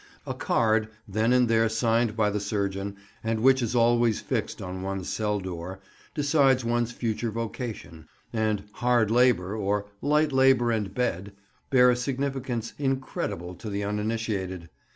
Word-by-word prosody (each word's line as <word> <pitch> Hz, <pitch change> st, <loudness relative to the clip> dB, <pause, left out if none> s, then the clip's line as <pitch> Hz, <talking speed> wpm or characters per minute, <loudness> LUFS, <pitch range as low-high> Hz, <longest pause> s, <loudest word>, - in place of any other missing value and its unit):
A -, -, -3 dB
card, 110 Hz, -1 st, +1 dB, 0.2 s
then 110 Hz, +4 st, +1 dB
and 125 Hz, -1 st, +4 dB
there 115 Hz, 0 st, +3 dB
signed 115 Hz, 0 st, +1 dB
by 105 Hz, -2 st, +2 dB
the 105 Hz, -, -1 dB
surgeon, 100 Hz, -1 st, -2 dB, 0.3 s
and 110 Hz, 0 st, -1 dB
which 130 Hz, +1 st, +5 dB
is 120 Hz, 0 st, -1 dB
always 120 Hz, -1 st, +3 dB
fixed -, -, -3 dB
on 95 Hz, 0 st, -5 dB
one's 95 Hz, -1 st, -4 dB
cell 105 Hz, -1 st, -1 dB
door, 95 Hz, 0 st, -6 dB, 0.4 s
decides 140 Hz, -4 st, +3 dB
one's 120 Hz, 0 st, 0 dB
future 115 Hz, 0 st, -2 dB
vocation; 110 Hz, -7 st, -6 dB, 0.3 s
and 110 Hz, -3 st, 0 dB
"Hard 120 Hz, -2 st, +2 dB
labour," 115 Hz, -5 st, +3 dB
or 100 Hz, -1 st, -1 dB, 0.2 s
"Light 150 Hz, +1 st, +2 dB
labour 130 Hz, -3 st, +4 dB
and 105 Hz, -4 st, -1 dB
bed," 100 Hz, -4 st, -2 dB, 0.4 s
bear 125 Hz, -2 st, +6 dB
a -, -, +2 dB
significance 130 Hz, -2 st, -3 dB
incredible 130 Hz, -, -2 dB
to 105 Hz, +5 st, -8 dB
the 100 Hz, 0 st, -2 dB
uninitiated. 105 Hz, -4 st, -2 dB
115 Hz, 150 wpm, -27 LUFS, 100-125 Hz, 0.4 s, bear